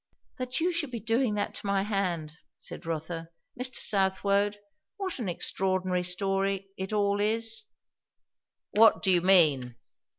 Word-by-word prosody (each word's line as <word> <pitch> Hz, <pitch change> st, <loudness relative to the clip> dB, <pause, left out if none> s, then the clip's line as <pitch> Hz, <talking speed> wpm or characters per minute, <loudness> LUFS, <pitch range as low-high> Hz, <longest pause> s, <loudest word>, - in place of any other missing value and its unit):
"That 255 Hz, +2 st, -1 dB
you 350 Hz, +3 st, +1 dB
should 330 Hz, -5 st, -1 dB
be 240 Hz, -2 st, -5 dB
doing 225 Hz, +1 st, +1 dB
that 205 Hz, -, -2 dB
to -, -, -6 dB
my 200 Hz, -1 st, +1 dB
hand!" 185 Hz, -7 st, -1 dB, 0.3 s
said 165 Hz, -, -7 dB
Rotha. 165 Hz, +1 st, -4 dB, 0.3 s
"Mr. 255 Hz, +1 st, -2 dB
Southwode, 200 Hz, +1 st, +1 dB, 0.4 s
what 380 Hz, -7 st, -3 dB
an 215 Hz, -6 st, -2 dB
extraordinary 185 Hz, +1 st, 0 dB
story 195 Hz, +2 st, -1 dB
it 190 Hz, +1 st, -5 dB
all 205 Hz, -1 st, +1 dB
is!" 225 Hz, -, -1 dB, 1.0 s
"What 225 Hz, +1 st, +5 dB
do 190 Hz, -, +3 dB
you 175 Hz, -1 st, +4 dB
mean?" 150 Hz, -10 st, +4 dB
195 Hz, 140 wpm, -28 LUFS, 180-225 Hz, 1.0 s, What